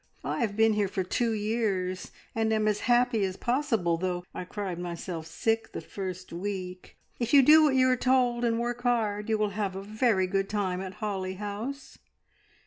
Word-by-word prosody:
I - - -2
have 215 -3 -1
been 220 0 +5
here 210 -1 +1
for 190 0 -2
two 230 +5 0
years, 205 -4 -1 0.2
and 225 0 0
am 215 -1 +2
as 210 -1 +1
happy 240 -3 +3
as 190 -1 -2
possible, 230 - +1
though 180 0 -2
I 180 - -5
cried 185 -2 -4
myself 170 -1 -5
sick 225 +7 -1
the - - -4
first 185 -2 -6
week. 185 0 -5 0.2
If 240 +3 +2
you 275 - +8
do 310 +4 +8
what 295 -4 +4
you 255 0 +5
are 255 - +4
told 250 -1 +2
and 230 -1 +1
work 240 0 -2
hard, 220 -4 0
you 220 - +2
will 210 -1 +1
have 200 -2 -2
a 195 - -5
very 215 -2 +1
good 195 +1 -1
time 190 -3 -1
at 190 -1 -6
Holly 190 -2 -3
House." 210 +8 -6
210 Hz, 195 wpm, -28 LUFS, 185-235 Hz, 0.2 s, you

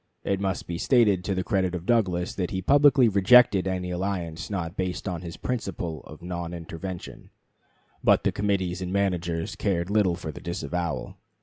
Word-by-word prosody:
It 100 -1 0
must 95 -1 -2
be 85 -1 -5
stated 105 -8 +3
to 100 - -1
the 95 - -1
credit 95 0 0
of 85 -1 -5
Douglas, 95 -7 +1
that 90 -3 -2
he 95 -1 -3
publicly 140 0 +5
rejected 100 -1 +5
any 90 -1 -2
alliance 90 -4 -3
not 90 -3 -3
based 90 0 -3
on 90 -3 -3
his 85 -2 -8
principle 90 - -4
of 75 +2 -12
"non 85 -1 -4
intervention"; 85 +2 -7 0.7
but - - +4
the - - +2
committees 95 -3 -1
and 90 0 -3
managers 90 -1 -1
cared 95 -3 -1
little 100 -5 +3
for 80 -3 -6
the - - -10
disavowal. 85 -1 -3
90 Hz, 175 wpm, -26 LUFS, 85-100 Hz, 0.7 s, publicly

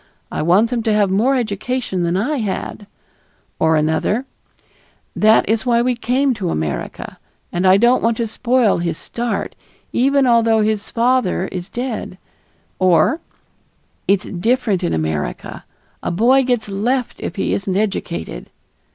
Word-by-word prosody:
I - - -2
want 190 +9 +3
them 240 -2 0
to 220 -1 +1
have 205 -2 +2
more 235 +8 +2
education 225 -3 -2
than 170 +1 0
I 275 +10 0
had"; 205 -2 -4 0.7
or 160 0 +3
another, 160 - 0 0.9
"That 215 +1 +4
is 225 +1 +1
why 240 -2 +2
we 250 0 +1
came 255 +3 +1
to 200 -6 -3
America, 75 - -4 0.3
and 180 +2 +1
I 185 +1 +7
don't 240 +4 +4
want 230 0 +1
to 235 - 0
spoil 235 -1 +1
his 170 -2 -2
start, 235 0 -4 0.4
even 275 +2 +3
although 230 -2 +4
his 215 0 -1
father 235 -6 +1
is 180 -1 -6
dead"; 240 -6 -4 0.6
or 185 - +3 0.9
"It's 200 0 +2
different 215 +1 0
in 85 - 0
America. 80 -2 -4 0.4
A - - -3
boy 240 +9 +4
gets 245 -4 0
left 235 +6 -1
if 170 - -5
he 195 - -1
isn't 195 -1 -1
educated." 85 - -3
215 Hz, 145 wpm, -19 LUFS, 185-245 Hz, 0.9 s, I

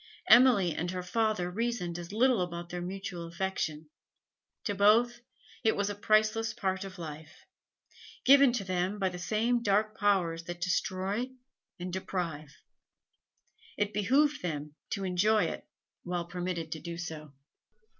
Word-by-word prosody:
Emily 235 -9 +6
and 175 +3 -3
her 180 0 -4
father 210 -2 0
reasoned 205 -5 -2
as 170 +1 -8
little 240 0 +3
about 170 -1 -4
their 175 0 -4
mutual 180 -1 -5
affection; 165 -4 -3 0.7
to 205 - -1
both 225 +4 +4 0.4
it 220 - +3
was 200 0 0
a - - -3
priceless 215 +2 +2
part 190 -5 -1
of 195 -1 -9
life, 155 -2 -9 0.8
given 275 -1 +7
to 235 -5 -1
them 185 +2 -1
by 190 -2 +1
the 180 -1 -7
same 230 +6 +1
dark 215 0 +1
powers 180 -6 +1
that 175 0 -6
destroy 190 +6 -1 0.5
and 180 0 -5
deprive. 170 -6 -4 1.3
It 205 0 0
behoved 270 +8 +2
them 150 -4 -4 0.2
to 200 -3 -3
enjoy 205 +4 +3
it - - -4 0.3
while 175 -1 -3
permitted 175 -2 -4
to 160 - -4
do 170 +1 -6
so. 155 -4 -7
190 Hz, 145 wpm, -30 LUFS, 175-215 Hz, 1.3 s, given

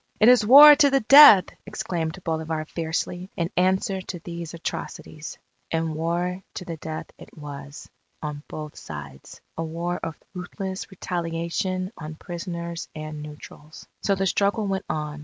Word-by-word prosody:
"It 215 - +6
is 250 -3 +6
war 290 +7 +10
to 285 -1 +5
the 275 0 +2
death!" 255 -6 +9 0.2
exclaimed 180 -5 -4
Bolivar 160 -1 -3
fiercely, 170 +3 -4
in 170 0 -2
answer 190 +1 +1
to 185 - -7
these 170 -1 -7
atrocities. 160 -2 -7 0.3
And 165 -1 -1
war 175 +3 -2
to 190 -5 -6
the 165 -2 -6
death 155 0 -7
it - - -15
was, 145 -1 -9 0.3
on 150 -1 -6
both 150 -1 -8
sides 70 -3 -10 0.2
a - - 0
war 170 +2 -3
of 160 - -5 0.2
ruthless 190 +1 -6
retaliation 180 +2 -3
on 155 0 -7
prisoners 170 -1 -6
and 155 -1 -7
neutrals. 150 0 -12
So 200 - +1
the 195 0 -1
struggle 200 +3 +1
went 195 -1 -2
on. 150 -1 -4
170 Hz, 150 wpm, -24 LUFS, 155-190 Hz, 0.3 s, war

